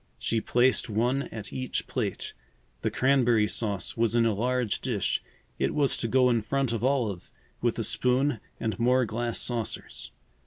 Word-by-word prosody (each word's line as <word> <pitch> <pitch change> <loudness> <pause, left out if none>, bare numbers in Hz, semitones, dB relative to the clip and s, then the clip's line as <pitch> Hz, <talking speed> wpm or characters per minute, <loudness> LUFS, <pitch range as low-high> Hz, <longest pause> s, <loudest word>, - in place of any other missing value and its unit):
She 115 -1 -1
placed 125 +1 +2
one 125 +6 0
at 110 -2 -7
each 130 -1 -2
plate. - - -3 0.5
The - - +1
cranberry 120 -5 +3
sauce 100 -5 -1
was 115 -1 +1
in 115 -1 +4
a 115 - +2
large 125 +1 0
dish. 115 -8 0 0.4
It - - 0
was 145 -2 +2
to 115 - -2
go 130 +2 +4
in 115 -2 +2
front 135 +2 0
of 115 - -2
Olive, 120 -9 0 0.3
with - - +1
a - - -1
spoon 125 0 +1 0.2
and 110 0 -2
more 125 +2 +3
glass 115 +1 -2
saucers. 115 -3 -3
120 Hz, 165 wpm, -28 LUFS, 110-130 Hz, 0.5 s, in